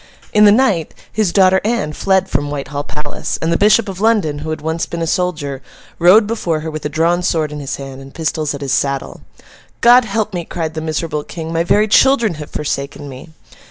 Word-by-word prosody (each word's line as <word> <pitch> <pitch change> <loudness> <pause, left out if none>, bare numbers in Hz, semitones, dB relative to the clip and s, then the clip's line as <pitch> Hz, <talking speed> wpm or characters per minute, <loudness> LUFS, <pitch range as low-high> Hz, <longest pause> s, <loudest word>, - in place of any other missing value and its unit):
In 210 0 +6
the 205 - +8
night, 205 -8 +1 0.2
his 215 -5 +1
daughter 190 0 +4
Anne 215 -9 -1
fled 190 +3 +1
from 145 - -1
Whitehall 145 0 -4
Palace; 150 -1 -5
and 165 +1 0
the - - +2
Bishop 210 +2 +4
of 190 -1 -6
London, 205 -10 +2
who 155 +2 -6
had 155 - -3
once 160 +2 -2
been 170 -1 -4
a - - 0
soldier, 155 -6 -2 0.4
rode 185 +6 +6
before 180 -8 -2
her 160 +1 -5
with 155 -1 -6
a - - -8
drawn 165 +3 +1
sword 160 -4 0
in 150 - -6
his 140 0 -4
hand, 135 -1 -9
and 135 0 -12
pistols 155 -1 -2
at 140 - -9
his 135 -2 -1
saddle. 140 0 -2 0.6
'God 240 +1 +6
help 215 0 -2
me,' 175 -1 -3
cried 160 -2 -4
the 160 - -4
miserable 155 -1 -3
King: 165 0 -7
'my 165 0 +1
very 210 +5 +3
children 235 -2 +4
have 150 - -8
forsaken 145 -1 -4
me! 130 +5 -10
165 Hz, 215 wpm, -17 LUFS, 150-200 Hz, 0.6 s, the